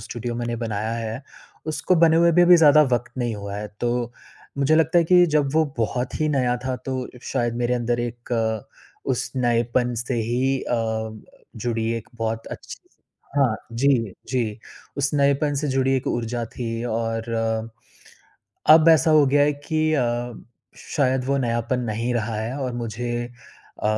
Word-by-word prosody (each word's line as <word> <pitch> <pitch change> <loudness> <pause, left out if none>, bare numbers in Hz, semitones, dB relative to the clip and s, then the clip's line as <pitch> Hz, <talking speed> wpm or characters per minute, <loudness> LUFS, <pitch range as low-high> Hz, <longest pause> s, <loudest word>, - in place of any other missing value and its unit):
Studio 120 0 -5
मैंने 120 0 -3
बनाया 110 -1 -3
है, 115 +2 -4 0.4
उसको 155 +3 +1
बने 160 -1 +6
हुए 170 0 +5
भी 175 +2 +5
अभी 175 0 +8
ज़्यादा 155 -1 +7
वक़्त 120 0 0
नहीं 120 -2 -1
हुआ 100 0 -6
है। 105 0 -5
तो 120 0 -1 0.5
मुझे 140 +3 +3
लगता 160 +2 +3
है 170 - +3
कि 180 +1 +6
जब 140 -2 +2
वो 160 0 +4
बहुत 125 +5 -2
ही 155 - +2
नया 125 -4 +1
था, 130 -1 -1
तो 130 0 -4
शायद 120 -3 -1
मेरे 120 0 0
अंदर 120 0 -1
एक 115 -2 -2 0.4
उस 125 -1 -1
नएपन 120 0 +1
से 120 +2 -3
ही 125 +4 0
अ - - -3
अ, 110 -1 -2 0.4
जुड़ी 115 0 -1
एक 115 - -8
बहुत 115 0 -3
अच्छी - - -9 0.6
हाँ, 130 -6 +3 0.2
जी, 115 -4 +2 0.2
जी, 115 -4 -1 0.4
उस 140 0 0
नएपन 140 +1 +2
से 145 +1 -1
जुड़ी 135 0 +1
एक 130 - -4
ऊर्जा 120 0 -2
थी 115 0 -5
और, 115 -1 -2 1.5
अब 155 +1 +8
ऐसा 160 0 +5
हो 150 -2 +6
गया 145 +2 +3
है 150 - +2
कि 155 +2 -1
अ, 120 -3 -1 0.4
शायद 130 -3 0
वो 140 +1 +1
नयापन 120 0 -1
नहीं 115 +2 -2
रहा 115 -1 -2
है 115 +6 -3
और 130 -2 -3
मुझे 120 0 -4
अ, 120 -1 -17
120 Hz, 170 wpm, -23 LUFS, 115-140 Hz, 1.5 s, अभी